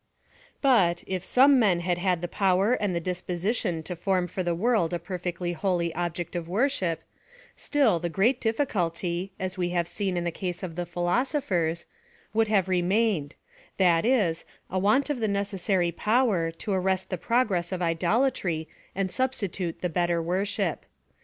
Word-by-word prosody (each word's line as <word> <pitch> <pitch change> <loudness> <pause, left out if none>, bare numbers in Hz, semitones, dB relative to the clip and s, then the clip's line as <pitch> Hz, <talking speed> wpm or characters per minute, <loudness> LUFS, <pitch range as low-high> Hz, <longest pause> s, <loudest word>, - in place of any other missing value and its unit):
But, 190 -11 +4
if 185 -2 -3
some 270 +1 +5
men 190 -7 +3
had 175 0 -1
had 180 -2 0
the - - -1
power 195 +4 +2
and 205 -7 0
the - - +1
disposition 180 +1 -2
to 180 - -5
form 185 +1 0
for 180 +2 -4
the 175 -1 0
world 195 -3 +1
a - - +1
perfectly 175 0 -4
holy 175 -2 0
object 175 +1 -3
of 170 -1 -4
worship, 195 - 0 0.5
still 265 - +2
the 175 +1 -2
great 230 +9 +2
difficulty, 185 - -1
as 185 0 -4
we 175 -1 0
have 170 -1 +1
seen 190 -2 -2
in 175 - -1
the 170 - -1
case 180 +1 -4
of 170 -3 -5
the 175 0 -3
philosophers, 175 - 0 0.5
would 225 0 +3
have 200 -4 +2
remained, 185 -3 +1 0.4
that 175 -3 +4
is, 210 -10 +2 0.3
a 185 - 0
want 215 +10 +2
of 275 - -2
the 220 - 0
necessary 195 -3 0
power, 210 -4 +1
to 165 +5 -4
arrest 190 0 0
the - - +1
progress 205 -8 +1
of 180 -1 -2
idolatry 170 -1 0 0.3
and 190 -1 -1
suh 260 +5 +2
stitute 190 -8 -4
the 180 - +1
better 175 0 +1
worship. 185 +5 -1
185 Hz, 165 wpm, -27 LUFS, 175-210 Hz, 0.5 s, some